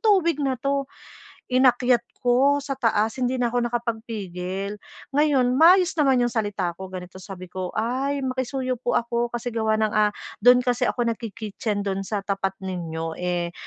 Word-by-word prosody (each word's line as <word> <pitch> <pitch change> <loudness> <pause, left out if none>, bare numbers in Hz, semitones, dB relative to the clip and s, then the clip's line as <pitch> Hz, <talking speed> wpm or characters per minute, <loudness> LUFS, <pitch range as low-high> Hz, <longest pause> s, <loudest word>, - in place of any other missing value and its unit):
tubig 370 - +3
na 270 -2 0
'to?" 275 +2 -1 0.6
Inakyat 250 -1 +4 0.2
ko 260 +4 +4
sa 280 - -3
taas, 225 +1 +1
hindi 250 +1 +1
na 240 -2 0
ako 240 -1 +1
nakapagpigil. 210 -5 -4 0.3
Ngayon, 295 +2 +3 0.3
maayos 360 +2 +6
naman 270 -4 +4
'yong 240 - -1
salita 205 -6 -1
ko. 190 - -7
Ganito 185 0 -8
sabi 185 -2 -9
ko, 185 -1 -3
"Ay 265 +5 -1
makisuyo 255 -1 -2
po 245 - 0
ako, 235 0 0
kasi 240 +1 -4
gawa 220 -1 +1
ng, 215 -1 0
ah, 215 -1 +4 0.3
do'n 245 +2 +6
kasi 245 0 +1
ako 240 - 0
nagki-kitchen 215 -2 -3
do'n 195 -1 -1
sa 205 -1 -2
tapat 195 -1 -1
ninyo, 165 -3 -4
eh, 175 -1 -1
235 Hz, 160 wpm, -24 LUFS, 200-255 Hz, 0.6 s, maayos